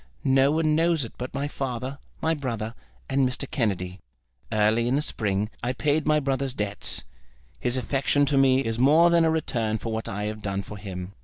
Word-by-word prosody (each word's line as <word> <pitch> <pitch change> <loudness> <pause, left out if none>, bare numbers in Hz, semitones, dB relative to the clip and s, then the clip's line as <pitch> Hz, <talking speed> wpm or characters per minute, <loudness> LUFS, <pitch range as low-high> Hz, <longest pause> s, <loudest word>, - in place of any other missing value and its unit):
No 135 +1 +4
one 155 0 +2
knows 165 -3 +2
it 115 - -10
but 125 +1 -4
my 140 +1 -2
father, 135 -1 -4 0.2
my 160 - +3
brother, 115 -7 -3 0.3
and 135 - +1
Mr. 130 +2 -3
Kennedy. 95 -8 -2 0.5
Early 110 +2 +3
in 125 - +2
the 145 - +2
spring 105 -2 -1
I 120 +2 -1
paid 150 +2 0
my 155 0 +4
brother's 135 -2 -1
debts. 105 -2 -1 0.6
His 120 - -1
affection 140 +2 +1
to 140 0 +1
me 135 -1 +4
is 115 0 -2
more 155 +6 +6
than 170 -1 +5
a - - +4
return 120 -9 0
for 115 +1 -4
what 110 0 -3
I 105 +1 -3
have 105 +1 -4
done 100 -1 -2
for 105 - -9
him. 95 -2 -6
130 Hz, 200 wpm, -26 LUFS, 110-145 Hz, 0.6 s, more